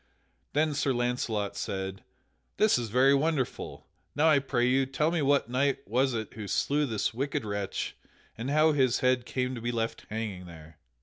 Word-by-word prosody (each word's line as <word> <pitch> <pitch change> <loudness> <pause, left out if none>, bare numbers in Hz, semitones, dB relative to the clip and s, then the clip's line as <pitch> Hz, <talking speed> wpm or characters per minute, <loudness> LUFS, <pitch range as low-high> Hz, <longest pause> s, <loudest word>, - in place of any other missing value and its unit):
Then 155 +1 +2
Sir 140 -1 +1
Launcelot 120 -4 -1
said: 95 0 -4 0.5
"This 215 -11 +4
is 115 -2 -4
very 130 +5 +5
wonderful. 140 -2 -1 0.3
Now 155 +3 +4
I 150 -2 +5
pray 130 -3 0
you, 130 +1 +2
tell 150 +4 0
me 170 -2 0
what 140 -3 +3
knight 135 +3 0
was 130 +4 +1
it 110 -2 -4
who 105 -2 -7
slew 145 +8 +1
this 110 -2 -1
wicked 135 -1 -2
wretch, 100 -2 -3 0.4
and 120 +4 -4
how 155 +2 +4
his 130 -4 +2
head 125 -1 +2
came 125 0 -1
to 120 - -6
be 120 +1 -1
left 115 -1 -3
hanging 105 -5 -4
here?" 80 -2 -13
125 Hz, 180 wpm, -29 LUFS, 110-140 Hz, 0.5 s, very